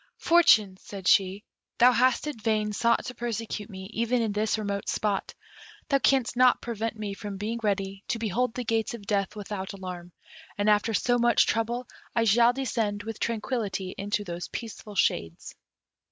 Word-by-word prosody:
"Fortune," 225 Hz, -, +5 dB
said 190 Hz, -1 st, -8 dB
she, 195 Hz, +2 st, +3 dB, 0.3 s
"thou 245 Hz, +1 st, +7 dB
hast 255 Hz, +2 st, +2 dB
in 300 Hz, -2 st, -3 dB
vain 215 Hz, -1 st, 0 dB
sought 235 Hz, +3 st, +2 dB
to 250 Hz, -, -5 dB
persecute 230 Hz, -3 st, -4 dB
me 190 Hz, -2 st, -8 dB
even 235 Hz, +2 st, +1 dB
in 225 Hz, -2 st, 0 dB
this 210 Hz, +2 st, 0 dB
remote 200 Hz, -2 st, -3 dB
spot; 205 Hz, -2 st, -1 dB, 0.5 s
thou 275 Hz, -1 st, +3 dB
canst 265 Hz, -3 st, +2 dB
not 250 Hz, 0 st, +5 dB
prevent 225 Hz, -1 st, -4 dB
me 210 Hz, -2 st, -4 dB
from 200 Hz, 0 st, -6 dB
being 220 Hz, +4 st, -3 dB
ready 195 Hz, -2 st, -2 dB
to -, -, -1 dB
behold 230 Hz, +2 st, -1 dB
the 250 Hz, -, -3 dB
gates 225 Hz, +1 st, -1 dB
of 210 Hz, -4 st, -11 dB
death 200 Hz, 0 st, -1 dB
without 200 Hz, -2 st, -5 dB
alarm, 180 Hz, -2 st, -7 dB, 0.5 s
and 205 Hz, +1 st, +3 dB
after 210 Hz, +1 st, +2 dB
so 245 Hz, +2 st, +2 dB
much 235 Hz, 0 st, +4 dB
trouble 235 Hz, +2 st, -1 dB, 0.3 s
I 230 Hz, -, +3 dB
shall 235 Hz, +2 st, +5 dB
descend 225 Hz, -5 st, -2 dB
with 225 Hz, -1 st, -6 dB
tranquillity 215 Hz, -5 st, -2 dB
into 205 Hz, +1 st, -2 dB
those 175 Hz, -2 st, -5 dB
peaceful 215 Hz, -2 st, -7 dB
shades." 85 Hz, -, -1 dB
215 Hz, 170 wpm, -27 LUFS, 200-235 Hz, 0.5 s, thou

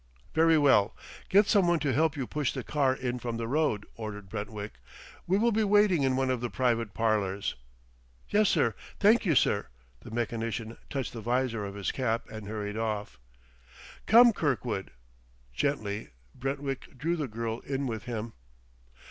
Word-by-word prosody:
"Very 160 Hz, 0 st, +5 dB
well. 130 Hz, -8 st, +4 dB, 0.3 s
Get 205 Hz, +2 st, +6 dB
some 200 Hz, -4 st, +3 dB
one 175 Hz, 0 st, +4 dB
to 140 Hz, -3 st, +1 dB
help 155 Hz, 0 st, +2 dB
you 135 Hz, -, -2 dB
push 150 Hz, +1 st, -1 dB
the -, -, -4 dB
car 135 Hz, -3 st, +1 dB
in 125 Hz, -1 st, -3 dB
from 120 Hz, -1 st, -3 dB
the 115 Hz, 0 st, -3 dB
road," 135 Hz, -6 st, +1 dB
ordered 105 Hz, -3 st, -7 dB
Brentwick; 105 Hz, -, -6 dB, 0.5 s
"we 185 Hz, +3 st, +3 dB
will 235 Hz, +3 st, +3 dB
be 220 Hz, 0 st, +2 dB
waiting 205 Hz, -5 st, +4 dB
in 130 Hz, -1 st, +2 dB
one 130 Hz, 0 st, +1 dB
of 125 Hz, -2 st, -1 dB
the 120 Hz, -, -2 dB
private 115 Hz, -5 st, 0 dB
parlors." 105 Hz, -3 st, 0 dB, 0.7 s
"Yes, 210 Hz, -1 st, +3 dB
sir; 135 Hz, -, +2 dB, 0.3 s
thank 210 Hz, +1 st, +4 dB
you, 160 Hz, -, +3 dB
sir." 100 Hz, -4 st, +2 dB, 0.3 s
The -, -, -11 dB
mechanician 115 Hz, 0 st, -3 dB
touched 135 Hz, -3 st, -3 dB
the 115 Hz, -, -6 dB
visor 120 Hz, -1 st, 0 dB
of 100 Hz, 0 st, -6 dB
his 100 Hz, -2 st, -2 dB
cap 115 Hz, -3 st, -1 dB
and 110 Hz, -2 st, -7 dB
hurried 105 Hz, 0 st, -4 dB
off. 105 Hz, -, -3 dB, 0.9 s
"Come, 235 Hz, +2 st, +8 dB
Kirkwood." 125 Hz, -, -1 dB, 0.6 s
Gently 110 Hz, -, -2 dB, 0.2 s
Brentwick 135 Hz, 0 st, -4 dB
drew 165 Hz, +6 st, 0 dB
the 150 Hz, -4 st, -2 dB
girl 115 Hz, 0 st, -3 dB
in 135 Hz, +1 st, -3 dB
with 115 Hz, -2 st, -4 dB
him. 115 Hz, -2 st, -4 dB
125 Hz, 165 wpm, -29 LUFS, 110-150 Hz, 0.9 s, Come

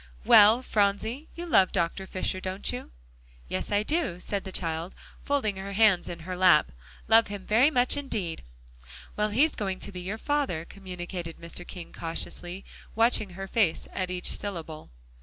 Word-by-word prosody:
"Well, 215 Hz, +4 st, +7 dB
Phronsie, 220 Hz, +7 st, 0 dB
you 345 Hz, -, -6 dB
love 195 Hz, -, +4 dB
Dr. 185 Hz, +1 st, -1 dB
Fisher, 185 Hz, 0 st, -2 dB
don't 185 Hz, +1 st, -2 dB
you?" -, -, -6 dB, 0.6 s
"Yes, 95 Hz, -, -3 dB
I 205 Hz, 0 st, +2 dB
do," 295 Hz, -, -1 dB
said 200 Hz, +2 st, -3 dB
the 190 Hz, -, -6 dB
child, 165 Hz, 0 st, -3 dB, 0.3 s
folding 245 Hz, -9 st, 0 dB
her 195 Hz, +1 st, -6 dB
hands 200 Hz, -3 st, +4 dB
in 170 Hz, -1 st, -7 dB
her 180 Hz, +3 st, -5 dB
lap, 180 Hz, -, +5 dB, 0.4 s
"love 225 Hz, +1 st, +6 dB
him 200 Hz, -2 st, -7 dB
very 235 Hz, +7 st, +5 dB
much 250 Hz, -3 st, +3 dB
indeed." 215 Hz, -, -3 dB, 0.7 s
"Well, 210 Hz, 0 st, +1 dB
he's 275 Hz, +9 st, +3 dB
going 190 Hz, -3 st, -3 dB
to -, -, -3 dB
be 180 Hz, -2 st, -7 dB
your 195 Hz, +5 st, -4 dB
father," 270 Hz, -, -1 dB
communicated 180 Hz, -3 st, -7 dB
Mr. 170 Hz, +1 st, -7 dB
King, 175 Hz, -3 st, -9 dB
cautiously 175 Hz, +2 st, -3 dB, 0.3 s
watching 225 Hz, -2 st, +3 dB
her 195 Hz, 0 st, -5 dB
face 195 Hz, -6 st, +1 dB
at 185 Hz, -1 st, -2 dB
each 180 Hz, 0 st, -1 dB
syllable. 165 Hz, -6 st, -6 dB
195 Hz, 165 wpm, -27 LUFS, 175-220 Hz, 0.7 s, Well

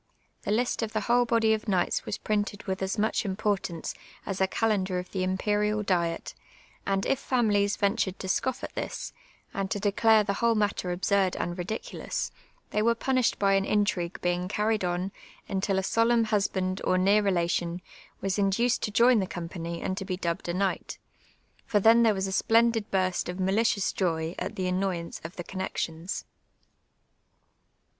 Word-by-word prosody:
The -, -, -3 dB
list 240 Hz, +3 st, +1 dB
of 220 Hz, -1 st, -3 dB
the 215 Hz, -, 0 dB
whole 240 Hz, +3 st, +3 dB
body 230 Hz, -2 st, +3 dB
of 215 Hz, -, -2 dB
kni;^hts 190 Hz, -5 st, 0 dB
was -, -, -2 dB
printed 205 Hz, -1 st, -2 dB
with 190 Hz, 0 st, -3 dB
as 190 Hz, 0 st, -1 dB
much 215 Hz, +1 st, +1 dB
importance 190 Hz, -4 st, -2 dB, 0.3 s
as 195 Hz, -1 st, -3 dB
a 190 Hz, -, +4 dB
calendar 195 Hz, -3 st, 0 dB
of 180 Hz, 0 st, -5 dB
the 190 Hz, -, -2 dB
Imperiid 210 Hz, +3 st, 0 dB
diet, 170 Hz, -3 st, 0 dB, 0.5 s
and 195 Hz, -1 st, +1 dB
if 270 Hz, -, +1 dB
families 205 Hz, -6 st, +1 dB
ventmvd 200 Hz, -2 st, 0 dB
to 190 Hz, -, -6 dB
scoff 260 Hz, +7 st, -1 dB
at -, -, -5 dB
this, -, -, -5 dB, 0.4 s
and 195 Hz, -1 st, -2 dB
to 205 Hz, -, -1 dB
declare 215 Hz, +2 st, +4 dB
the 200 Hz, -1 st, -1 dB
whole 235 Hz, -1 st, +3 dB
matter 205 Hz, -4 st, 0 dB
absurd 190 Hz, +1 st, +1 dB
and 175 Hz, -, -2 dB
ridicidous, 185 Hz, +5 st, -4 dB, 0.4 s
they 210 Hz, -, +1 dB
were 230 Hz, +2 st, +3 dB
punished 255 Hz, 0 st, +1 dB
by 195 Hz, -1 st, +3 dB
an 195 Hz, 0 st, +3 dB
intrip^ue 200 Hz, -4 st, 0 dB
beinp 180 Hz, -2 st, -1 dB
carried 210 Hz, 0 st, 0 dB
on 180 Hz, +2 st, -1 dB, 0.4 s
until 195 Hz, 0 st, 0 dB
a 190 Hz, -, +1 dB
solemn 230 Hz, +3 st, +3 dB
husband 195 Hz, -3 st, 0 dB
or 185 Hz, -, +2 dB
neiu* 200 Hz, +3 st, +4 dB
relation 175 Hz, -2 st, 0 dB, 0.4 s
was 195 Hz, +1 st, -1 dB
induced 230 Hz, +5 st, +2 dB
to -, -, -1 dB
join 235 Hz, +2 st, +5 dB
the 190 Hz, -, -1 dB
company 170 Hz, -1 st, -5 dB
and 185 Hz, -, -2 dB
to 195 Hz, -, -3 dB
be 185 Hz, -1 st, -3 dB
dubbed 170 Hz, -1 st, -3 dB
a -, -, 0 dB
knij^^ht; 195 Hz, 0 st, -1 dB, 0.7 s
for 210 Hz, -, +3 dB
then 225 Hz, +3 st, +6 dB
tlierc 220 Hz, -2 st, +4 dB
was 190 Hz, 0 st, -1 dB
a 190 Hz, -, -3 dB
splendid 225 Hz, +1 st, +3 dB
burst 185 Hz, -2 st, 0 dB
of 180 Hz, +1 st, -5 dB
malicious 200 Hz, +2 st, +1 dB
joy 165 Hz, -3 st, -1 dB
at -, -, -4 dB
the 190 Hz, -, -3 dB
amioyaiicc 180 Hz, -2 st, -2 dB
of 165 Hz, +2 st, -8 dB
the 175 Hz, -, -5 dB
connexions. 180 Hz, -1 st, -4 dB
195 Hz, 175 wpm, -28 LUFS, 185-215 Hz, 0.7 s, then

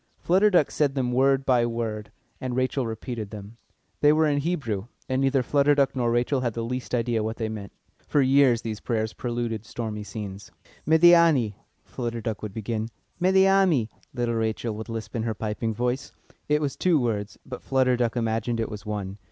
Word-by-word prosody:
Flutter 190 Hz, +5 st, +3 dB
Duck 175 Hz, -7 st, +3 dB
said 145 Hz, -2 st, +1 dB
them 125 Hz, -2 st, 0 dB
word 135 Hz, +2 st, +3 dB
by 125 Hz, -3 st, +3 dB
word, 115 Hz, -2 st, -3 dB, 0.3 s
and 125 Hz, -1 st, -3 dB
Rachel 130 Hz, 0 st, 0 dB
repeated 110 Hz, -1 st, -5 dB
them. 105 Hz, +2 st, -10 dB, 0.4 s
They 145 Hz, -, +5 dB
were 155 Hz, +1 st, +3 dB
in 145 Hz, -2 st, +2 dB
Hebrew, 135 Hz, -, -2 dB, 0.2 s
and 130 Hz, +1 st, 0 dB
neither 135 Hz, -1 st, +2 dB
Flutter 145 Hz, +2 st, +3 dB
Duck 140 Hz, -1 st, +2 dB
nor 120 Hz, -2 st, +1 dB
Rachel 120 Hz, +3 st, +1 dB
had 120 Hz, -3 st, -2 dB
the 115 Hz, -, -2 dB
least 125 Hz, +1 st, -3 dB
idea 115 Hz, -1 st, 0 dB
what 110 Hz, +1 st, -3 dB
they 110 Hz, -2 st, -2 dB
meant. 105 Hz, -2 st, -7 dB, 0.4 s
For 145 Hz, -, +2 dB
years 135 Hz, -3 st, +4 dB
these 110 Hz, -2 st, -4 dB
prayers 110 Hz, -1 st, -2 dB
preluded 120 Hz, -3 st, -3 dB
stormy 110 Hz, -2 st, -5 dB
scenes. 100 Hz, -2 st, -7 dB, 0.4 s
"Médiâni!" 160 Hz, -8 st, +5 dB, 0.3 s
Flutter 120 Hz, -2 st, -4 dB
Duck 110 Hz, -2 st, -4 dB
would 105 Hz, -, -5 dB
begin. 110 Hz, +1 st, -3 dB, 0.3 s
"Médiâni!" 190 Hz, -, +4 dB, 0.2 s
little 120 Hz, -2 st, -1 dB
Rachel 110 Hz, 0 st, -1 dB
would 110 Hz, +2 st, -7 dB
lisp 110 Hz, -1 st, -6 dB
in 115 Hz, -, -1 dB
her 110 Hz, -1 st, -2 dB
piping 110 Hz, +2 st, -2 dB
voice. 125 Hz, +4 st, -2 dB, 0.4 s
It 150 Hz, +1 st, +3 dB
was 140 Hz, -3 st, -2 dB
two 175 Hz, -4 st, +2 dB
words, 110 Hz, -4 st, -2 dB
but 130 Hz, -, -7 dB
Flutter 130 Hz, -1 st, +2 dB
Duck 120 Hz, -1 st, 0 dB
imagined 115 Hz, 0 st, -1 dB
it 115 Hz, -, -1 dB
was 105 Hz, 0 st, -8 dB
one. 100 Hz, -1 st, -4 dB
120 Hz, 185 wpm, -25 LUFS, 110-135 Hz, 0.4 s, They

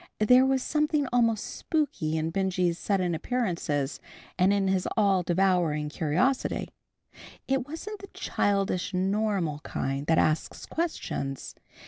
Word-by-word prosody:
There 250 Hz, +5 st, +5 dB
was 265 Hz, -1 st, +1 dB
something 300 Hz, -1 st, +1 dB
almost 230 Hz, -3 st, +3 dB
spooky 285 Hz, -, -1 dB
in 160 Hz, +1 st, -1 dB
Benjy's 180 Hz, -2 st, 0 dB
sudden 185 Hz, -4 st, 0 dB
appearances, 165 Hz, -, -1 dB, 0.4 s
and 185 Hz, +2 st, +3 dB
in 200 Hz, -1 st, +2 dB
his 190 Hz, -1 st, +1 dB
all 200 Hz, -3 st, +4 dB
devouring 175 Hz, -4 st, +1 dB
curiosity. 175 Hz, -, 0 dB, 0.8 s
It 265 Hz, 0 st, 0 dB
wasn't 390 Hz, +8 st, -7 dB
the 395 Hz, -, -10 dB
childish 195 Hz, -, -1 dB
normal 190 Hz, -5 st, 0 dB
kind 135 Hz, -2 st, -3 dB
that 160 Hz, -, +3 dB
asks 155 Hz, 0 st, 0 dB
questions. 140 Hz, -, -3 dB
190 Hz, 120 wpm, -27 LUFS, 165-250 Hz, 0.8 s, There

